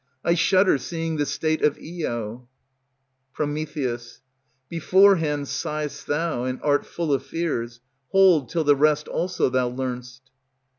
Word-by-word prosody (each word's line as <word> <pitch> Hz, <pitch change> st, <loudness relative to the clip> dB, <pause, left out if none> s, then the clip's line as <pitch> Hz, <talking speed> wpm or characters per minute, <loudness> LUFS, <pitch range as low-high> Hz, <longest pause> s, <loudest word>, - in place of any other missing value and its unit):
I 170 Hz, -, +4 dB
shudder, 185 Hz, -2 st, +3 dB
seeing 165 Hz, +2 st, -3 dB
the 145 Hz, -1 st, 0 dB
state 155 Hz, +3 st, -1 dB
of 150 Hz, -, +2 dB
Io. 120 Hz, -8 st, -5 dB, 0.8 s
Pr. -, -, -2 dB, 1.2 s
Beforehand 165 Hz, -4 st, +3 dB
sigh'st 150 Hz, +1 st, -4 dB
thou, 150 Hz, -4 st, -1 dB
and 130 Hz, 0 st, -3 dB
art 145 Hz, -1 st, +1 dB
full 165 Hz, -4 st, -2 dB
of 135 Hz, -, 0 dB
fears, 120 Hz, -8 st, -3 dB, 0.3 s
Hold 185 Hz, -8 st, +4 dB
till 165 Hz, -2 st, 0 dB
the 145 Hz, -1 st, +5 dB
rest 150 Hz, +1 st, +2 dB
also 180 Hz, +1 st, 0 dB
thou 125 Hz, -1 st, +1 dB
learn'st. 125 Hz, 0 st, -5 dB
150 Hz, 130 wpm, -24 LUFS, 130-165 Hz, 1.2 s, the